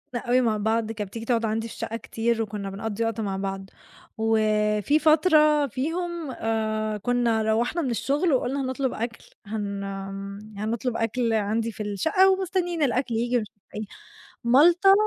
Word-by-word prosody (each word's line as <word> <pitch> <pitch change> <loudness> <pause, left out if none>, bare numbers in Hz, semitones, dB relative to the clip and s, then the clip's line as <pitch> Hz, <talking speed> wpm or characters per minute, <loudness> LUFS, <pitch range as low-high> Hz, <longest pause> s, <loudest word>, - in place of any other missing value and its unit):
أوي 245 +1 +2
مع 225 -3 +1
بعض، 220 +1 0
كانت 210 -3 -5
بتيجي 225 +3 -7
تقعد 230 -1 +1
عَندي 225 +1 -1
في - - -9
الشقة 230 - -4
كتير، 230 +1 -1
وكنا 205 -2 -4
بنقضّي 220 +3 -3
وقت 225 0 -2
مع 195 -2 -2
بعض، 195 0 -4 0.5
وفي 215 +3 +2
فترة 305 -2 +4
فيهم 325 +4 -3
آآ 215 -2 -1
كنا 235 0 +1
روّحنا 230 +10 +1
من 275 - -1
الشغل 285 +7 +1
وقُلنا 270 +2 0
هنطلب 260 0 -1
أكل، 230 +1 -5 0.2
هن 200 -2 -3 0.7
هنطلب 225 +3 -2
أكل 230 +1 0
عَندي 220 +2 0
في 215 - -6
الشقة، 315 - +3
ومستنيين 365 -3 0
الأكل 255 -2 0
ييجي، 240 +2 +1
ومش 215 -3 -2
عارفة 205 - -20
إيه، 215 - -4 0.6
مالطا 340 +10 +6
230 Hz, 155 wpm, -25 LUFS, 215-275 Hz, 0.7 s, مالطا